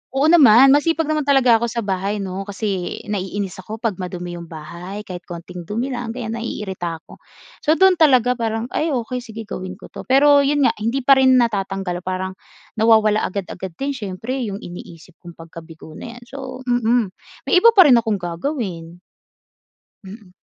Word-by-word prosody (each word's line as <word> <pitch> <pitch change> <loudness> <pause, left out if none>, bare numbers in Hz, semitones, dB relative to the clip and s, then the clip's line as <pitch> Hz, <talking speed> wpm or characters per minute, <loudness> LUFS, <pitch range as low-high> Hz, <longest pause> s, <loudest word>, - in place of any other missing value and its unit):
Oo, 290 +4 +3
naman. 270 -5 +7
Masipag 325 +3 +2
naman 305 -1 -2
talaga 255 -5 +4
ako 235 - -1
sa 235 0 -3
bahay, 195 +1 -2
'no? 195 +1 -5
Kasi 200 -3 -4
naiinis 195 -1 -4
ako 200 +4 -7
‘pag 220 -4 -3
madumi 180 -1 -6
yung 170 - -10
bahay, 175 +6 -8
kahit 180 -3 -9
konting 175 0 -9
dumi 235 +6 -3
lang, 240 -2 -5
ganiyan, 235 -3 -5
naiirita 190 -7 -4
ako. - - -16 0.4
So, 310 +1 +2
do’n 380 0 +4
talaga 255 -6 +5
parang, 230 -1 -3
ay 315 - -1
okey 250 -4 -2
sige 225 -2 -9
gawin 185 -3 -7
ko 195 - -14
'to, - - -10
pero 285 +2 +5
yun 285 +1 +2
nga, - - +4
hindi 235 +5 -1
pa 270 +1 +6
rin 260 -1 +5
natatanggal 195 -6 0
parang 185 0 -4 0.4
nawawala 220 -1 +4
agad-agad 185 -2 -6
din 275 +7 -3
siyempre, 235 +2 -4
yung 200 0 -6
iniisip 175 -1 -11
kung 170 -2 -12
pagkabigo 165 -1 -12
na 235 +9 -9
‘yan. 245 - -13
So, 260 0 -9
mm, 240 -4 +1 0.3
may 365 - +4
iba 460 +4 +5
pa 380 - +9
rin 260 -7 +6
akong 220 -2 -1
gagawin. 175 - -5 1.1
Mm. 190 -1 -12
220 Hz, 175 wpm, -20 LUFS, 185-255 Hz, 1.1 s, pa